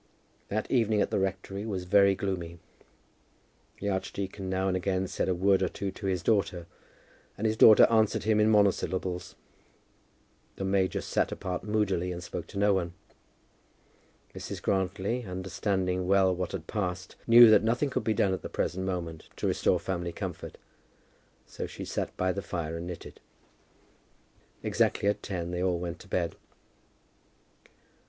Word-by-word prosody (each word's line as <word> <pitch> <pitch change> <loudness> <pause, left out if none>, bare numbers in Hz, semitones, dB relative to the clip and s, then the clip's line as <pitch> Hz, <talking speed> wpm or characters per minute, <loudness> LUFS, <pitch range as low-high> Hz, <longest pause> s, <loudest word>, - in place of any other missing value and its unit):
That 110 +1 -3
evening 110 -4 +2
at - - -4
the - - +1
rectory 95 +1 -3
was 100 -5 -3
very 100 +2 +4
gloomy. 90 -3 -4 1.2
The 100 - -2
archdeacon 95 0 -4
now 95 0 0
and 95 - +1
again 95 0 0
said 95 - -2
a 90 - +1
word 95 +2 +3
or 95 - +1
two 100 +2 -4
to 95 +1 -6
his 90 -2 -1
daughter, 95 -5 +1 0.7
and 110 - -3
his 110 0 +2
daughter 110 -1 +8
answered 110 -2 +2
him 110 0 +2
in 105 +1 +4
monosyllables. 95 -3 +1 1.2
The - - -5
major 95 -1 +1
sat - - 0
apart 90 -3 -4
moodily, 100 -4 0
and 90 0 -6
spoke - - -6
to - - -9
no 100 0 +4
one. 85 -3 -1 1.4
Mrs. - - -6
Grantly, 95 +5 -1
understanding 95 0 -2
well 95 -1 +4
what 90 0 -4
had 85 -5 -5
passed, 90 -2 -4
knew 120 -1 +9
that - - +7
nothing 120 +6 0
could - - -1
be 110 - 0
done 95 -1 +2
at 95 - -3
the - - -6
present 95 +1 -2
moment 85 -4 -4
to - - -4
restore - - +2
family 85 -2 -3
comfort; - - -6 0.9
so - - -6
she - - -8
sat - - -4
by 95 0 +1
the 100 - -3
fire 85 -3 -4
and 85 +1 -6
knitted. 90 -1 -8 1.4
Exactly - - +1
at 105 0 +1
ten 90 -3 -4
they 90 0 -2
all 90 -1 +1
went 85 0 -5
to - - -14
bed. 90 -3 -1
95 Hz, 160 wpm, -29 LUFS, 90-100 Hz, 1.4 s, knew